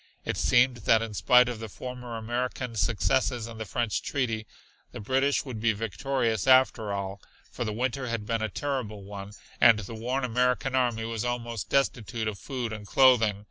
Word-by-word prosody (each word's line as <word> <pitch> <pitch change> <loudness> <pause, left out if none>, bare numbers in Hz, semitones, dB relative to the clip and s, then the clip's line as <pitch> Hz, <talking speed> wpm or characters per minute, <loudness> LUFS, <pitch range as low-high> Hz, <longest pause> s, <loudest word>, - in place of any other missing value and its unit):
It - - -1
seemed 125 0 +3
that 110 0 +3
in 110 -2 -6
spite 125 +4 +5
of 120 -3 -4
the 110 -1 -6
former 125 +1 -7
American 120 +1 -3
successes 120 +3 +1
and 115 -1 -9
the 110 - -4
French 115 0 -1
treaty, 115 -6 -2 0.5
the - - -7
British 135 +7 +1
would 125 -5 -6
be 115 -1 +3
victorious 115 +2 -1
after 130 -5 +4
all, 100 -1 -4 0.3
for - - -4
the 110 - -2
winter 130 +3 -2
had 115 -3 -3
been 115 +1 -1
a 110 - -1
terrible 110 -5 -4
one, 100 0 -8 0.3
and 115 -2 +8
the 105 +1 -7
worn 125 +4 -2
American 125 +2 +1
army 120 -3 +1
was 115 -1 -3
almost 120 -3 -3
destitute 120 -4 0
of 105 -2 -4
food 125 -5 -4
and 105 -2 -8
clothing. 115 -5 +4
115 Hz, 180 wpm, -27 LUFS, 110-125 Hz, 0.5 s, and